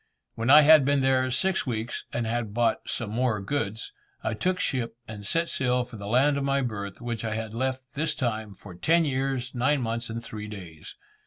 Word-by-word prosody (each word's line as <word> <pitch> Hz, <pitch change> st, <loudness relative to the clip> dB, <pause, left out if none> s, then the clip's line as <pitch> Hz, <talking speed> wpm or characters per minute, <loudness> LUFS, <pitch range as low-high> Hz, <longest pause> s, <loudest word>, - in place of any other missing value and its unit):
When 115 Hz, +2 st, -2 dB
I 150 Hz, +2 st, +10 dB
had 155 Hz, -1 st, +8 dB
been 140 Hz, +1 st, +2 dB
there 130 Hz, -1 st, +2 dB
six 185 Hz, +6 st, +1 dB
weeks, 115 Hz, -1 st, -3 dB
and 120 Hz, -, -2 dB
had 115 Hz, -2 st, -2 dB
bought 120 Hz, -2 st, +1 dB
some 115 Hz, -3 st, -3 dB
more 120 Hz, -2 st, +1 dB
goods; 110 Hz, 0 st, -3 dB, 0.3 s
I 110 Hz, -, -1 dB
took 180 Hz, +12 st, 0 dB
ship 120 Hz, -4 st, -1 dB
and 105 Hz, -2 st, -7 dB
set 165 Hz, +6 st, +1 dB
sail 125 Hz, -3 st, +1 dB
for 120 Hz, -2 st, -10 dB
the 100 Hz, 0 st, -7 dB
land 140 Hz, +6 st, +3 dB
of -, -, -2 dB
my 140 Hz, 0 st, +1 dB
birth, 100 Hz, -5 st, -4 dB
which 120 Hz, -2 st, -4 dB
I 110 Hz, -1 st, -2 dB
had 110 Hz, -1 st, -4 dB
left, 130 Hz, +2 st, -2 dB
this 155 Hz, +3 st, -1 dB
time, 110 Hz, -5 st, -2 dB
for 95 Hz, 0 st, -11 dB
ten 165 Hz, -, +3 dB
years, 130 Hz, -2 st, -1 dB
nine 135 Hz, +4 st, +2 dB
months 115 Hz, +1 st, -2 dB
and 115 Hz, +1 st, -5 dB
three 105 Hz, -2 st, -6 dB
days. 90 Hz, -7 st, -10 dB
120 Hz, 210 wpm, -27 LUFS, 110-135 Hz, 0.3 s, I